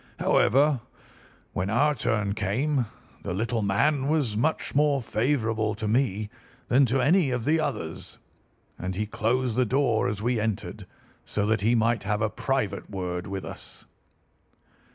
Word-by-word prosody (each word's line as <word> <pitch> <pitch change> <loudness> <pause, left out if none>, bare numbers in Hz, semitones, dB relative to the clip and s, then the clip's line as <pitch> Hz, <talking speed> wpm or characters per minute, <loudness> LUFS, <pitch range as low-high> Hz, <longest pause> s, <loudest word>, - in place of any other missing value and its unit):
However, 140 +1 +3 0.7
when 90 +2 -1
our 145 +7 +3
turn 105 -7 0
came 120 +6 0 0.3
the 90 - -4
little 115 +3 -1
man 130 +8 +1
was 145 -8 +1
much 150 +9 0
more 145 -1 +3
favourable 110 -3 0
to 105 0 -4
me 110 -3 0 0.4
than 130 +2 +5
to 130 +3 +1
any 165 +2 +4
of 125 -2 -2
the 160 +3 +3
others, 110 - -4 0.6
and 90 +1 -3
he 105 +3 -1
closed 115 +3 0
the 130 - +3
door 125 -2 +1
as 100 - -2
we 120 +2 0
entered, 110 -2 -3 0.4
so 105 - -2
that 110 -1 +1
he 115 +4 +3
might 115 -1 +2
have 105 +2 -1
a 110 - 0
private 135 -8 -2
word 90 -2 -4
with 95 -1 -5
us. - - -9
115 Hz, 155 wpm, -26 LUFS, 105-135 Hz, 0.7 s, than